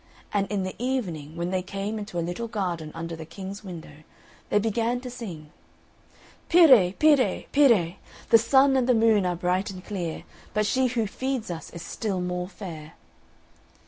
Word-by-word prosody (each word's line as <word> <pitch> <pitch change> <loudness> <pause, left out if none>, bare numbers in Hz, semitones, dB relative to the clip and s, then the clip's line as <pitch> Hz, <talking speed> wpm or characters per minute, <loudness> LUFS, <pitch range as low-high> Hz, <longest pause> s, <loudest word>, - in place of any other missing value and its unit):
And 200 -1 +1
in 200 -2 0
the 185 - -4
evening 180 - -3
when 170 +1 -3
they 185 -1 0
came 195 +3 -4
into 205 -4 -6
a 170 - 0
little 175 +7 -4
garden 175 -8 -3
under 165 0 -5
the 160 - -8
King's 195 +5 -8
window, 165 -6 -9 0.5
they - - +3
began 225 +3 0
to 250 -1 -7
sing 175 -11 -8 1.0
"Pire, 260 - +7
pire 275 -7 +3
pire! 220 - +4 0.3
The 230 - +8
sun 270 +4 +4
and 255 -1 +2
the 250 - +5
moon 220 -4 +4
are 175 - 0
bright 180 +3 0
and 185 -1 -9
clear, 175 -6 -4 0.3
But 215 0 +2
she 260 +4 +2
who 235 -2 0
feeds 255 0 -3
us 165 -1 -6
is 170 - -9
still 205 -5 -3
more 180 0 -2
fair." 165 -6 -9
195 Hz, 175 wpm, -26 LUFS, 175-230 Hz, 1.0 s, The